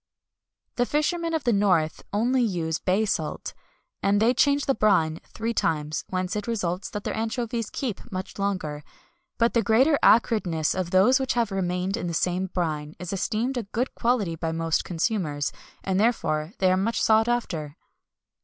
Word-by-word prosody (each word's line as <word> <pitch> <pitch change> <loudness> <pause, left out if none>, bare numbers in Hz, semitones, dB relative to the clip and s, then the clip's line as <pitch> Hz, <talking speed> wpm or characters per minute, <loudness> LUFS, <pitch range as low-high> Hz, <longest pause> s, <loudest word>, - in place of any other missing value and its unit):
The 245 0 +2
fishermen 330 +2 0
of 315 - -2
the 240 - +2
north 180 -6 +2
only 245 +5 +2
use 170 -7 -1
bay 195 +4 +1
salt, 160 -7 -3 0.5
and 200 +1 +2
they 230 +3 +4
change 285 +2 +2
the 270 - +2
brine 180 -8 +2
three 230 +1 -4
times, 155 -6 -1
whence 185 +1 -2
it 210 +1 -3
results 185 -5 -2
that 205 -1 -5
their - - -3
anchovies 230 0 -2
keep 240 -8 -5
much 185 +1 -6
longer; 180 -7 -2 0.5
but 230 0 +2
the 235 - +3
greater 255 +8 +4
acridness 190 -9 +3
of 185 -2 -2
those 200 +9 +5
which 265 -1 0
have 235 -3 0
remained 185 0 -1
in - - -3
the 170 - -3
same 180 +2 0
brine 155 -4 -3
is 180 +1 -6
esteemed 225 +7 -1
a - - 0
good 235 +6 -3
quality 230 -8 0
by 165 0 -3
most 165 0 0
consumers, 165 -5 -1 0.3
and 190 0 0
therefore 170 -7 0
they 185 -1 +3
are 185 - +3
more 210 +5 0
sought 220 0 +3
after. 170 -11 -2
200 Hz, 170 wpm, -25 LUFS, 170-235 Hz, 0.5 s, those